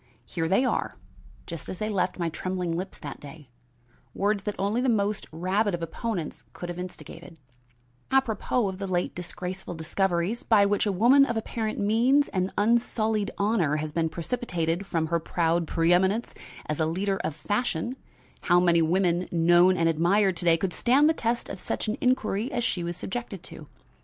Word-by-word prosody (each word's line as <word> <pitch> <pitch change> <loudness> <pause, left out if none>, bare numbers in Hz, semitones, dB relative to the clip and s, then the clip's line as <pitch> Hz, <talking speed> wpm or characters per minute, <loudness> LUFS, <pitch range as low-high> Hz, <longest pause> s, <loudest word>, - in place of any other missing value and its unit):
Here 165 -1 -2
they 195 +10 +3
are, - - -1 0.5
just 165 -3 -7
as 185 - -5
they 215 - -2
left 195 -3 0
my 170 -2 -1
trembling 180 +1 -3
lips 185 +3 -5
that 145 - -8
day 145 -1 -12 0.7
words 200 0 0
that 210 - -2
only 205 +5 0
the 260 - +1
most 210 -2 0
rabid 185 +5 0
of 170 - -6
opponents 180 -1 -4
could 175 - -7
have 175 0 -5
instigated: 180 -2 -9 0.7
Apropos 250 -3 +1
of 190 -1 -5
the 195 - -3
late 180 -1 -1
disgraceful 180 0 -6
discoveries, 175 +5 -1
by 210 -3 +4
which 205 +1 +1
a - - +2
woman 240 +9 +5
of 240 -4 0
apparent 220 0 -3
means 240 +8 +3
and 185 -1 -1
unsullied 220 -1 +1
honor 200 -8 +1
has 155 0 -3
been 160 +1 0
precipitated 175 -2 -2
from 165 -4 0
her 170 +1 0
proud 165 0 0
preeminence 180 +8 +2 0.3
as 150 +1 -3
a 160 - +2
leader 195 +4 -1
of 155 - -3
fashion, 205 - -2 0.5
how 175 0 +5
many 170 -2 +4
women, 175 +1 +1
known 175 +2 +5
and 165 - +2
admired 175 +4 +2
to 175 - -4
day, 165 -1 +5
could 180 +1 -2
stand 270 - +4
the 320 - +4
test 235 -5 -2
of 195 - -7
such - - -3
an 215 - 0
inquiry 250 -1 +1
as 240 -3 -1
she 180 -6 -1
was 170 0 -4
subjected 195 -4 -5
to? - - -9
190 Hz, 180 wpm, -26 LUFS, 170-215 Hz, 0.7 s, woman